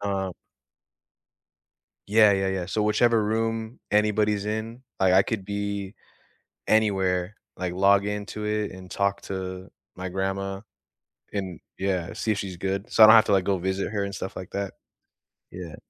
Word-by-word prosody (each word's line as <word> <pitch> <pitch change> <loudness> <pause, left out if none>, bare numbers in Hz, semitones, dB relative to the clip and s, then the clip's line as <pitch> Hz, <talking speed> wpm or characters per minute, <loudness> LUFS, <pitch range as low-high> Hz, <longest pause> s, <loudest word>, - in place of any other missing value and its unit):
Uh 95 -2 -2 1.8
Yeah, 105 -1 +6
yeah, 95 0 +1
yeah. 95 -2 -2
So 105 +3 -1
whichever 110 +1 +3
room 115 +2 -2
anybody's 105 0 +2
in, 110 +3 -4 0.2
I 95 -1 +4
I 95 - +7
could 105 -3 -3
be 100 0 -4 0.7
anywhere, 95 -3 +2 0.2
like, 90 -1 -3
log 100 +1 +4
into 105 +1 -4
it 105 -1 -1
and 95 0 -11
talk 100 0 0
to 95 0 -5 0.3
my 90 0 -5
grandma 95 +1 -3 0.7
and, 95 -4 -4 0.2
yeah, 95 -2 -1
see 110 - -1
if 100 - -2
she's 95 -3 -5
good. 95 +3 -3
So 110 - +5
I - - +13
don't 110 - +9
have 110 - +7
to, - - +1
like, 95 -2 +3
go 100 -1 +1
visit 95 +2 -2
her 100 -2 -1
and 100 0 -5
stuff 95 - -6
like 95 - -7
that. 100 -1 -4 0.8
Yeah. 85 -4 -8
100 Hz, 160 wpm, -25 LUFS, 95-105 Hz, 1.8 s, I